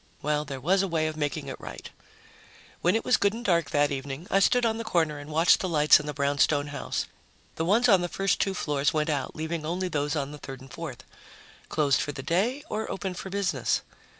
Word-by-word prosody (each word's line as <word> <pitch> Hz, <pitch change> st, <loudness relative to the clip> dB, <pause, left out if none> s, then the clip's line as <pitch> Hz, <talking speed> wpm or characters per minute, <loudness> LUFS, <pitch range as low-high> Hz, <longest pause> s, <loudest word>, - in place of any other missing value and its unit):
Well, 150 Hz, 0 st, 0 dB
there 140 Hz, -2 st, -6 dB
was 185 Hz, +8 st, +2 dB
a 195 Hz, -, 0 dB
way 165 Hz, -3 st, 0 dB
of 155 Hz, 0 st, -2 dB
making 145 Hz, -3 st, -2 dB
it -, -, -6 dB
right. -, -, -8 dB, 0.9 s
When 180 Hz, +3 st, +3 dB
it 225 Hz, -, -1 dB
was 250 Hz, -, +4 dB
good 200 Hz, 0 st, +2 dB
and 235 Hz, +2 st, -7 dB
dark 170 Hz, -6 st, +2 dB
that 145 Hz, 0 st, +2 dB
evening, 140 Hz, +3 st, -5 dB
I 195 Hz, -, +4 dB
stood 245 Hz, +4 st, +3 dB
on 225 Hz, 0 st, 0 dB
the -, -, -3 dB
corner 160 Hz, -8 st, 0 dB
and 145 Hz, +1 st, -10 dB
watched 160 Hz, +3 st, +4 dB
the 185 Hz, -, -2 dB
lights 150 Hz, -2 st, +6 dB
in 150 Hz, -, -7 dB
the -, -, -1 dB
brownstone 145 Hz, +1 st, +2 dB
house. 145 Hz, -, -3 dB, 0.5 s
The 160 Hz, -, -1 dB
ones 225 Hz, +7 st, +4 dB
on 195 Hz, -6 st, +5 dB
the 175 Hz, -, -2 dB
first 195 Hz, +2 st, 0 dB
two 195 Hz, -1 st, 0 dB
floors 145 Hz, -3 st, 0 dB
went 155 Hz, +1 st, +1 dB
out, 140 Hz, -3 st, -2 dB
leaving 160 Hz, +1 st, -3 dB
only 180 Hz, +4 st, -2 dB
those 145 Hz, -1 st, -1 dB
on 140 Hz, -2 st, -2 dB
the 150 Hz, -, -9 dB
third 135 Hz, -2 st, -8 dB
and 130 Hz, -1 st, -13 dB
fourth. 135 Hz, -7 st, -7 dB, 0.7 s
Closed 145 Hz, -3 st, +2 dB
for 145 Hz, -, -3 dB
the 135 Hz, -, -7 dB
day... 220 Hz, -, 0 dB
or 220 Hz, -4 st, -3 dB
open 190 Hz, 0 st, -3 dB
for 185 Hz, +2 st, -7 dB
business? 200 Hz, -1 st, 0 dB
155 Hz, 230 wpm, -27 LUFS, 145-190 Hz, 0.9 s, lights